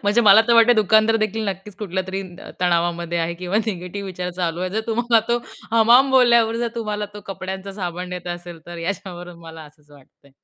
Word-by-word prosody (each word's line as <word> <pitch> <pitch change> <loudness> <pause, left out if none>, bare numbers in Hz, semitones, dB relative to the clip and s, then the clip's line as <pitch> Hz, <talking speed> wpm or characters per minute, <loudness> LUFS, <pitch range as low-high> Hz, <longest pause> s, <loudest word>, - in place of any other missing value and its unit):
म्हणजे 205 +4 +3
मला 215 -1 +7
तर 235 - +5
वाटतंय 230 +1 +6
दुकानदारदेखील 215 +1 +2
नक्कीच 195 +1 -7
कुठल्यातरी 190 -1 -4 0.2
अ, - - -10
तणावामध्ये 170 -1 0
आहे 165 +1 -1
किंवा 180 +3 -3
निगेटिव्ह 195 0 -5
विचार 180 -1 -5
चालू 170 -1 -1
आहे, 185 0 -2
जर 220 +3 -1
तुम्हाला 230 0 +2
तो 240 - +2 0.4
हमाम 240 +4 +6
बोलल्यावर 235 -3 +4
जर 240 0 -1
तुम्हाला 210 -2 -3
तो 210 - -8
कपड्यांचा 190 0 -6
साबण 180 -2 -5
देत 180 -1 -7
असेल, 175 -1 -11
तर 175 0 -8
याच्यावरून 175 -1 -6
मला 165 -1 -11
असंच 150 0 -20
वाटतंय. 140 0 -21
190 Hz, 185 wpm, -21 LUFS, 175-220 Hz, 0.4 s, मला